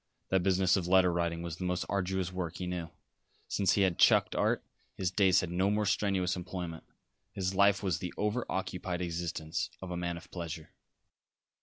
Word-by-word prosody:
That 95 -1 +3
business 95 0 +3
of 90 -3 -1
letter 90 -1 +5
writing 85 -1 -1
was 85 -1 -5
the 90 - -5
most 90 0 -1
arduous 95 -2 -1
work 90 -3 -3
he 90 - -4
knew. 90 -2 -4 0.6
Since 100 -2 +2
he 100 - +3
had 95 -3 +1
"chucked" - - +5
art, - - +1 0.3
his 90 -3 -1
days 95 -1 +4
had 90 - -4
no 95 +3 +2
more 105 +1 +1
strenuous 95 -2 +1
employment; 90 -2 -6 0.5
his 95 0 -1
life 100 +1 +4
was 90 -5 0
the 90 -2 -4
over 105 +4 0
occupied 90 -1 -3
existence 85 +2 -3
of 95 -1 -7
a 90 - -3
man 85 -1 -2
of 85 - -13
pleasure. 85 -3 -6
90 Hz, 185 wpm, -31 LUFS, 85-95 Hz, 0.6 s, letter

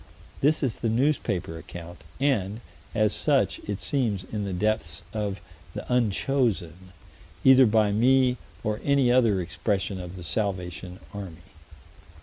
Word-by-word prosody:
This 150 +2 +3
is 125 -5 0
the 115 - -1
newspaper 110 - 0
account, 85 0 -10 0.2
and, 115 -6 0 0.3
as 110 -2 +3
such, - - +2
it 105 -1 -2
seems 105 -1 0
in 105 -2 -4
the 100 - -3
depths 90 -4 -1
of 105 -2 -2 0.4
the - - -5
unchosen, 105 -6 0 0.5
either 130 -1 +8
by 105 -1 +3
me 125 +3 +4 0.3
or 105 0 -2
any 140 -3 +3
other 115 -6 +4
expression 95 +2 -2
of 90 0 -7
the 90 - -8
Salvation 90 -2 -3
Army. 95 -6 -8
105 Hz, 130 wpm, -26 LUFS, 90-125 Hz, 0.5 s, either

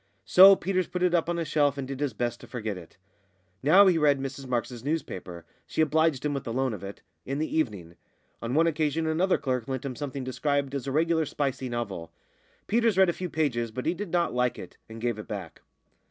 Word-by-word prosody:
So 195 +2 +9
Peters 185 0 -1
put 180 0 -3
it 180 -1 +3
up 170 -1 +2
on 175 - -1
a 165 - -1
shelf 145 -2 +1
and 135 -2 -4
did 135 -1 -6
his 145 -2 0
best 120 +1 -2
to - - -12
forget 110 -4 -4
it. 90 -2 -12 0.6
Now 180 +9 +7
he 180 -4 +4
read 145 -2 +3
Mrs 135 0 -6
Marks's 120 -1 -3
newspaper 95 - -4 0.2
(she - - -6
obliged 160 -2 +2
him 150 - 0
with 140 - -3
the 115 - -5
loan 130 0 0
of 100 - -7
it) 100 +1 -8 0.2
in 135 +2 -3
the 155 +1 -2
evening. 100 - -2 0.4
On 120 +3 -2
one 165 +2 +4
occasion 160 0 0
another 170 +4 +2
clerk 125 -4 -2
lent 130 0 -4
him 130 -2 -4
something 140 -1 -5
described 140 +1 -1
as 140 -1 -4
a - - -1
regular 160 +1 +1
spicy 135 -3 -2
novel. 100 -9 -4 0.5
Peters 230 -2 +2
read 190 -2 +6
a - - +1
few 180 +1 -5
pages, 130 -8 0
but 125 +3 -6
he 165 - +2
did 195 +1 -6
not 175 0 +1
like 125 0 0
it, - - -10
and 115 0 -9
gave 120 -2 -1
it 105 - -8
back. 95 -6 -7
140 Hz, 225 wpm, -27 LUFS, 120-160 Hz, 0.6 s, So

